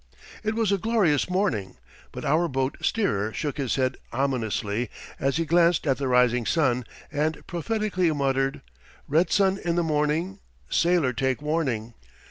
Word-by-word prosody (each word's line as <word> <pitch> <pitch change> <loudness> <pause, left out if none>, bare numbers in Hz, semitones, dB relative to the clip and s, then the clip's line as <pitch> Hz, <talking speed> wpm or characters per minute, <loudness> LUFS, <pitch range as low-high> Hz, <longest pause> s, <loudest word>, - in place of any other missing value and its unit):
It 215 0 -1
was 225 -3 +1
a 200 - +2
glorious 190 -9 +2
morning, 180 - -1 0.3
but - - -7
our 160 +4 +2
boat 135 -2 -1
steerer 110 - 0
shook 145 -1 -3
his 135 -4 0
head 130 -1 0
ominously 115 -3 -1 0.3
as 135 +2 +1
he 165 - 0
glanced 170 0 +3
at 135 -2 +1
the 140 - -1
rising 125 -1 +3
sun 125 -6 +1 0.3
and 155 +2 -1
prophetically 185 0 0
muttered: 135 -2 0 0.5
"Red 160 +5 +2
sun 195 -1 +3
in 170 -1 0
the 175 - +2
morning, 160 +5 0 0.3
sailor 170 -7 +2
take 130 +1 0
warning." 140 -7 -1
150 Hz, 150 wpm, -25 LUFS, 130-175 Hz, 0.5 s, glanced